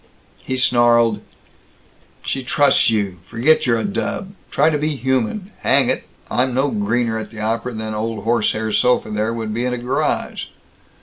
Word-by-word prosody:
He 130 - -4
snarled, 120 -3 +3 1.0
"She 135 - -2
trusts 145 +1 +3
you. 100 -5 -1
Forget 125 +6 +2
you're 115 -2 +3
a - - -2
dub. 200 -1 -3 0.2
Try 150 +3 +3
to 150 - 0
be 150 0 -1
human. 130 - -1
Hang - - +3
it, - - -3 0.2
I'm 125 0 0
no 135 +2 +2
greener 120 - 0
at 110 - -7
the 110 - -11
opera 115 +3 -2
than 110 -1 -4
old 110 +1 -3
horsehair 110 -1 0
sofa 115 +1 +2
there 105 +2 -1
would 110 -2 -4
be 120 +3 -1
at 125 - -1
a - - -2
garage." 125 +2 -1
120 Hz, 170 wpm, -20 LUFS, 110-130 Hz, 1.0 s, snarled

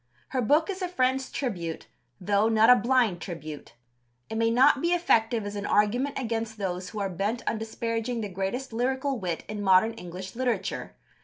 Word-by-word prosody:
Her 255 - -1
book 295 +8 +3
is 380 0 -7
a 365 - 0
friend's 260 -5 0
tribute, 175 - -3 0.3
though 205 +3 +2
not 225 +1 +6
a - - +9
blind 235 -6 +2
tribute. 155 -6 -7 0.6
It - - -3
may 225 0 +2
not 265 +4 +5
be 340 +1 +2
effective 230 -10 +2
as 205 0 -5
an 205 0 -3
argument 245 +7 +1
against 225 -3 -3
those 185 -2 -3
who 215 - -6
are 200 - 0
bent 200 +6 -3
on 220 - 0
disparaging 230 +1 -3
the 210 - -3
greatest 200 +7 -4
lyrical 265 +2 -1
wit 175 -4 -3
in 210 -1 -5
modern 190 +3 +5
English 185 -1 -8
literature. 250 -1 -2
225 Hz, 180 wpm, -27 LUFS, 195-255 Hz, 0.6 s, a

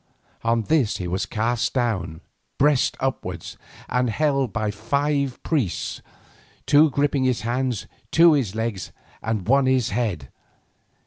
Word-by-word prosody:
On 115 0 +1
this 135 -3 +1
he 90 - -4
was 90 +2 -2
cast 115 +3 -1
down, 95 -10 -1 0.4
breast 145 -2 +3
upwards, 90 -11 -4 0.3
and 125 0 +1
held 135 +2 +1
so - - -21
by 110 -1 -1
five 140 +5 -1
priests, 135 - -1 0.6
two 150 +2 +5
gripping 140 0 +1
his 130 -2 +1
hands, 120 +1 -1 0.2
two 165 0 +6
his 120 -9 0
legs, 110 -6 -3 0.3
and 110 -4 -2
one 135 +2 +4
his 130 -4 +2
head. 100 - -2
120 Hz, 135 wpm, -23 LUFS, 105-140 Hz, 0.6 s, two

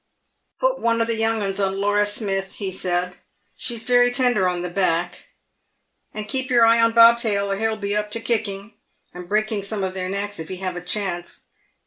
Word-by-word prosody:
"Put - - +1
one 230 0 +1
o' 230 - +2
the 230 - -1
young 225 -1 0
'uns 195 0 -3
on 195 -1 0
Laura 205 +1 +2
Smith," 195 -2 -3
he 195 -2 -5
said, 180 0 -2 0.4
"she's 235 -2 -4
very 245 +1 +4
tender 245 -7 +2
on 175 -1 -3
the 180 - -3
back; 175 -2 -1 0.8
and 215 0 -6
keep 260 +4 -1
your 240 -2 +5
eye 230 0 +5
on 230 0 +3
Bobtail, 230 -4 +5
or 195 - -1
he'll 220 +1 -1
be 205 -1 -2
up 210 0 -1
to 230 - -3
kicking, 220 -3 -3 0.4
and 180 0 -9
breaking 215 0 0
some 200 0 -3
of 190 -1 -2
their 185 -1 -4
necks, 200 0 -4
if 160 - -7
he 185 - -5
have 185 -1 -4
a 175 - -5
chance. 180 -2 -4
205 Hz, 200 wpm, -22 LUFS, 190-230 Hz, 0.8 s, your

